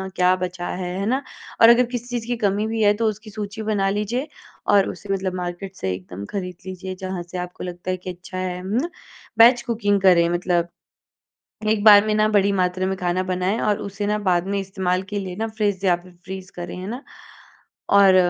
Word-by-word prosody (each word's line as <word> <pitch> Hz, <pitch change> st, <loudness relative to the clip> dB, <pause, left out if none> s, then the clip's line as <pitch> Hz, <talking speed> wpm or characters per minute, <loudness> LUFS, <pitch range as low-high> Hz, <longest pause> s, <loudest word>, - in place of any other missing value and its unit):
क्या 180 Hz, 0 st, +4 dB
बचा 180 Hz, -1 st, -4 dB
है, 180 Hz, -1 st, -3 dB
है 200 Hz, -, -1 dB
ना? 260 Hz, +5 st, +1 dB, 0.4 s
और 230 Hz, -, +10 dB
अगर 240 Hz, +1 st, +6 dB
किसी 245 Hz, -1 st, -3 dB
चीज़ 240 Hz, -2 st, -3 dB
की 245 Hz, -1 st, -1 dB
कमी 205 Hz, 0 st, +1 dB
भी 225 Hz, 0 st, -2 dB
है 205 Hz, 0 st, +5 dB
तो 225 Hz, +2 st, -1 dB
उसकी 215 Hz, +1 st, -7 dB
सूची 210 Hz, +1 st, -6 dB
बना 200 Hz, -2 st, +1 dB
लीजिए 215 Hz, +8 st, -1 dB, 0.5 s
और 200 Hz, -1 st, +5 dB
उसे 195 Hz, -1 st, -4 dB
मतलब 190 Hz, -1 st, -2 dB
मार्केट 180 Hz, +2 st, -5 dB
से 95 Hz, -, -2 dB
एकदम 90 Hz, +2 st, -7 dB
ख़रीद 180 Hz, -3 st, -4 dB
लीजिए 185 Hz, 0 st, -6 dB
जहाँ 185 Hz, -1 st, -5 dB
से 175 Hz, +1 st, -8 dB
आपको 180 Hz, 0 st, -6 dB
लगता 180 Hz, +1 st, -4 dB
है 185 Hz, -, -1 dB
कि 185 Hz, +1 st, -8 dB
अच्छा 180 Hz, +1 st, -8 dB
है 180 Hz, -1 st, -3 dB
म 195 Hz, +3 st, -4 dB
ना। 340 Hz, -, -3 dB, 0.5 s
बैच 240 Hz, +1 st, +7 dB
कुकिंग 205 Hz, -4 st, +1 dB
करें 175 Hz, -3 st, +5 dB
मतलब 175 Hz, -1 st, +1 dB, 1.0 s
एक 215 Hz, -1 st, +2 dB
बार 205 Hz, -1 st, +9 dB
में 215 Hz, -, +1 dB
ना 215 Hz, 0 st, +3 dB
बड़ी 200 Hz, 0 st, +4 dB
मात्रा 185 Hz, 0 st, +1 dB
में 190 Hz, 0 st, -1 dB
ख़ाना 180 Hz, 0 st, 0 dB
बनाएँ 185 Hz, +5 st, 0 dB
और 210 Hz, -1 st, +1 dB
उसे 200 Hz, 0 st, -4 dB
ना 210 Hz, 0 st, +1 dB
बाद 175 Hz, +1 st, +2 dB
में 200 Hz, 0 st, 0 dB
इस्तेमाल 190 Hz, -1 st, -1 dB
के 205 Hz, -, -2 dB
लिए 185 Hz, -2 st, -5 dB
ना 225 Hz, +1 st, -1 dB
फ़्रिज 205 Hz, -3 st, -1 dB
या 180 Hz, -2 st, +4 dB
फ़िर 180 Hz, +1 st, -16 dB
फ़्रीज़ 190 Hz, 0 st, -7 dB
करें, 175 Hz, 0 st, -6 dB
है 185 Hz, -, -6 dB
ना। 250 Hz, +5 st, -5 dB, 0.9 s
और 195 Hz, -2 st, +7 dB
190 Hz, 215 wpm, -22 LUFS, 180-210 Hz, 1.0 s, और